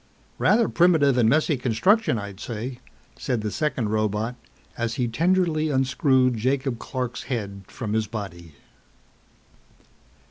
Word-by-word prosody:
"Rather 225 0 +4
primitive 160 -6 +4
and 120 -3 +4
messy 155 +3 +2
construction, 135 - +2
I'd 100 -2 -7
say," 120 +3 -5 0.4
said 125 -5 -1
the 105 -1 -3
second 130 -6 -1
robot 110 +2 -1 0.4
as 115 -1 -2
he 125 - 0
tenderly 165 +3 +1
unscrewed 130 -2 +2
Jacob 130 +1 -1
Clark's 125 -2 -4
head 100 -6 -4
from 110 -4 -5
his 110 -1 0
body. 85 -7 -7
125 Hz, 120 wpm, -24 LUFS, 110-140 Hz, 0.4 s, Rather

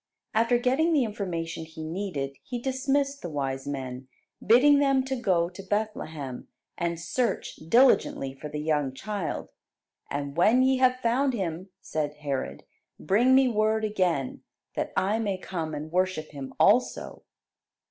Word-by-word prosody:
After 230 +2 +3
getting 265 +7 +2
the 285 -4 +4
information 180 -7 -4
he 160 0 -9
needed, 155 -5 -3
he 250 - -5
dismissed 275 +2 0
the 175 - -5
wise 135 -3 -3
men, 130 -2 -5 0.4
bidding 280 +7 +6
them 275 -2 +3
to 265 0 -2
go 185 -9 +1
to 185 - -9
Bethlehem 185 - -3 0.3
"and 170 -1 -2
search 235 +8 -1
diligently 165 - +3
for 145 +3 -8
the 150 - -5
young 150 -3 0
child; 200 +2 -4 0.6
and 140 0 -4
when 220 +9 +5
ye 265 0 +3
have 255 0 +4
found 260 +3 +2
Him," 185 -2 -3
said 155 -5 -3
Herod, 145 -3 -4 0.4
"bring 235 +10 +4
me 265 0 +6
word 220 -1 +1
again, 180 -10 0 0.3
that - - -2
I 205 +4 +2
may 200 -4 -1
come 165 -4 -4
and 155 +2 -6
worship 185 -3 0
Him 140 -3 -7
also." 235 +5 +2
190 Hz, 145 wpm, -27 LUFS, 155-245 Hz, 0.6 s, bidding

